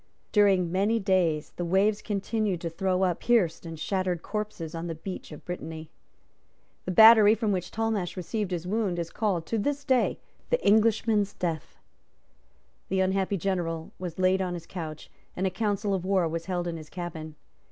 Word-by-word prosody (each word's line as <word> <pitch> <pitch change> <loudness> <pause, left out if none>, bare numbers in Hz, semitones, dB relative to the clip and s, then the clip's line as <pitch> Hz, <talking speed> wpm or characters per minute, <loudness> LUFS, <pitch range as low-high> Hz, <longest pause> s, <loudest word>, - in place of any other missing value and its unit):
During 195 -5 +4
many 200 +5 +2
days 180 -6 +1
the 175 - -2
waves 195 +4 +2
continued 205 -2 -1
to 170 - -3
throw 185 +2 0
up 180 -3 +1
pierced 180 -9 +1
and 165 -1 -7
shattered 185 -2 -1
corpses 210 -6 -4
on 165 +1 -4
the 165 - -4
beach 180 +3 -7
of 150 - -11
Brittany. 160 -3 -6 0.9
The 185 - -2
battery 220 +2 +8
from 220 -2 0
which 185 -2 -2
Talmash 220 -5 -2
received 190 +3 -2
his 175 -2 -3
wound 200 -2 -1
is 170 -1 -3
called, 195 -7 -1
to 225 - -1
this 285 +6 -1
day, 260 -3 +2 0.3
the - - +2
Englishman's 215 -1 +3
Death. 165 -3 -4 1.1
The 190 - +1
unhappy 190 +1 +1
general 170 -3 -2
was 180 -3 -5
laid 185 +1 +3
on 180 -1 -2
his 170 -1 -8
couch; 160 -4 -7 0.3
and 185 - 0
a 190 - +1
council 205 0 -1
of 190 -2 -1
war 190 -2 +2
was 165 +1 -4
held 175 -2 -2
in 170 -1 -3
his 155 -1 -10
cabin. 160 -3 -6
185 Hz, 175 wpm, -27 LUFS, 170-210 Hz, 1.1 s, battery